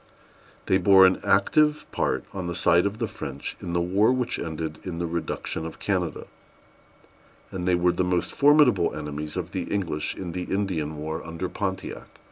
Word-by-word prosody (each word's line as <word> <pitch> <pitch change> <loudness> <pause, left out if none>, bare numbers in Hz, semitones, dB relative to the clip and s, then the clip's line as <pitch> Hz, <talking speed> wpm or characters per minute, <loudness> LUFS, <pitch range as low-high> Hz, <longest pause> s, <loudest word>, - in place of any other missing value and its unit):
They 95 - +3
bore 95 0 +7
an 95 0 +3
active 150 +9 +3
part, - - 0
on 95 -2 -4
the 85 - -3
side 90 +1 +4
of 100 +2 -5
the 115 -1 -1
French, 70 -7 -6
in 85 - -5
the 85 - +1
war 95 +6 +3
which 130 -2 -1
ended 80 -1 -4
in 90 -3 -5
the 85 - -2
reduction 85 -1 -3
of 80 - -7
Canada; 90 -5 -2 1.3
and 90 -1 -4
they 90 - +4
were 90 0 +3
the 90 +1 0
most 90 -1 0
formidable 140 - +4
enemies 75 +1 -5
of 90 -1 -4
the 95 -3 -3
English 90 -7 -2
in 90 -3 -5
the 90 +1 -4
Indian 85 -7 -2
war 80 +2 -4
under 85 +2 -4
Pontiac. 95 -2 -4
90 Hz, 180 wpm, -25 LUFS, 85-95 Hz, 1.3 s, bore